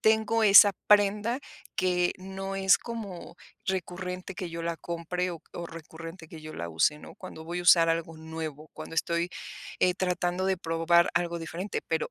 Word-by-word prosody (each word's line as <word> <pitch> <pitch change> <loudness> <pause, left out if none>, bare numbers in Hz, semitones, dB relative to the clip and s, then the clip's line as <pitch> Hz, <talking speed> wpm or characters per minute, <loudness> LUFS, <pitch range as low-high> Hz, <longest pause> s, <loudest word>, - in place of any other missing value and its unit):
tengo 220 +1 +3
esa 205 -1 +9 0.2
prenda, 210 +3 +4 0.4
que 180 -1 +2
no 195 +1 -5
es 190 -1 +5
como 200 -7 -7 0.3
recurrente 180 0 -4
que 180 -2 -5
yo 165 0 -5
la 170 0 -2
compre 175 +2 -3
o 170 -2 -7
o 170 - -5
recurrente 165 +1 -10
que 160 - -10
yo 155 0 -9
la 85 - -5
use, 85 - +2
¿no? - - -12
Cuando 160 - -10
voy 175 +2 -3
a - - -5
usar 170 -1 +6
algo 165 0 -1
nuevo, 160 -1 -7
cuando - - -8
estoy, 170 +1 0 0.5
eh, 180 -1 +4
tratando 180 0 -1
de 190 - +2
probar 165 0 +3
algo 170 0 0
diferente, 170 +4 -4
pero 160 -1 -1
175 Hz, 175 wpm, -28 LUFS, 165-190 Hz, 0.5 s, esa